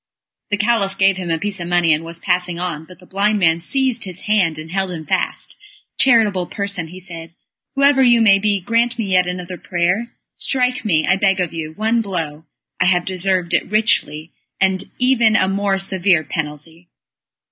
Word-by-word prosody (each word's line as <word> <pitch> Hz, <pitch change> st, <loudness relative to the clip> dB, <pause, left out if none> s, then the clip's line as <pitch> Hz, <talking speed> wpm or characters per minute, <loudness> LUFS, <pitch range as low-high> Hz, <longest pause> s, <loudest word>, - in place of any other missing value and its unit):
The 205 Hz, -, 0 dB
Caliph 205 Hz, -2 st, 0 dB
gave 195 Hz, 0 st, +3 dB
him 180 Hz, -2 st, -5 dB
a 165 Hz, -, +1 dB
piece 200 Hz, +2 st, -4 dB
of 170 Hz, -, -5 dB
money, 175 Hz, -2 st, +3 dB
and 155 Hz, +2 st, -1 dB
was 165 Hz, 0 st, -5 dB
passing 180 Hz, -1 st, -1 dB
on, 165 Hz, -3 st, -4 dB
but 185 Hz, +1 st, -15 dB
the 180 Hz, -, -18 dB
blind 205 Hz, +3 st, 0 dB
man 165 Hz, -4 st, +2 dB
seized 255 Hz, +2 st, -1 dB
his 185 Hz, -1 st, -8 dB
hand, 190 Hz, -7 st, +1 dB
and 155 Hz, +1 st, -9 dB
held 190 Hz, 0 st, -1 dB
him 165 Hz, -3 st, -7 dB
fast. -, -, -1 dB, 0.4 s
"Charitable 215 Hz, -8 st, +3 dB
person," 200 Hz, -4 st, -3 dB
he 180 Hz, +3 st, -11 dB
said, 170 Hz, -2 st, -10 dB, 0.4 s
"whoever 275 Hz, 0 st, +4 dB
you 240 Hz, -2 st, +5 dB
may 200 Hz, -3 st, +5 dB
be 205 Hz, -1 st, +1 dB
grant 235 Hz, +5 st, 0 dB
me 225 Hz, -, -2 dB
yet 180 Hz, -1 st, +3 dB
another 180 Hz, 0 st, -5 dB
prayer. 180 Hz, +7 st, -1 dB, 0.3 s
Strike 250 Hz, -1 st, 0 dB
me, 160 Hz, -8 st, +1 dB
I 190 Hz, -, +2 dB
beg 195 Hz, -1 st, +2 dB
of 175 Hz, -3 st, -2 dB
you, 160 Hz, -1 st, -5 dB
one 220 Hz, +5 st, 0 dB
blow. 165 Hz, -6 st, -4 dB, 0.3 s
I 185 Hz, -, +2 dB
have 180 Hz, -1 st, +2 dB
deserved 185 Hz, -1 st, -1 dB
it -, -, +1 dB
richly, 195 Hz, -7 st, 0 dB, 0.3 s
and 190 Hz, -1 st, +1 dB
even 245 Hz, -4 st, +3 dB
a 190 Hz, -, +3 dB
more 195 Hz, 0 st, 0 dB
severe 190 Hz, -3 st, +1 dB
penalty." 160 Hz, +3 st, -6 dB
185 Hz, 190 wpm, -19 LUFS, 170-210 Hz, 0.4 s, you